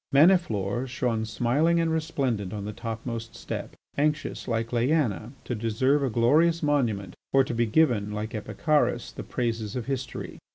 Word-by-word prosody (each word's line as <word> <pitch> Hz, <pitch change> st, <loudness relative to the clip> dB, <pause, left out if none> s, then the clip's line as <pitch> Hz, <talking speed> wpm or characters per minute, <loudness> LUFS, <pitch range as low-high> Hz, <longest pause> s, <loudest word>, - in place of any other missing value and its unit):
Maniflore 135 Hz, -, +3 dB
shone 120 Hz, -3 st, -1 dB
smiling 130 Hz, +10 st, +2 dB
and 165 Hz, -1 st, +1 dB
resplendent 135 Hz, -, -1 dB
on 105 Hz, -1 st, -4 dB
the 105 Hz, -, -4 dB
topmost 115 Hz, +1 st, -5 dB
step, -, -, -6 dB, 0.2 s
anxious, 150 Hz, +1 st, -1 dB
like 115 Hz, -1 st, -1 dB
Leaena, 120 Hz, -3 st, +1 dB
to -, -, -3 dB
deserve 120 Hz, +6 st, +1 dB
a 135 Hz, -, +1 dB
glorious 155 Hz, +9 st, +3 dB
monument, 115 Hz, -11 st, +1 dB, 0.2 s
or 135 Hz, 0 st, +6 dB
to 130 Hz, -, -4 dB
be 115 Hz, 0 st, +1 dB
given, 110 Hz, -5 st, +2 dB
like 105 Hz, +2 st, -4 dB
Epicharis, 150 Hz, +7 st, 0 dB
the -, -, -6 dB
praises 115 Hz, -4 st, -2 dB
of 125 Hz, -3 st, -3 dB
history. 135 Hz, -1 st, -4 dB
120 Hz, 155 wpm, -27 LUFS, 110-145 Hz, 0.2 s, or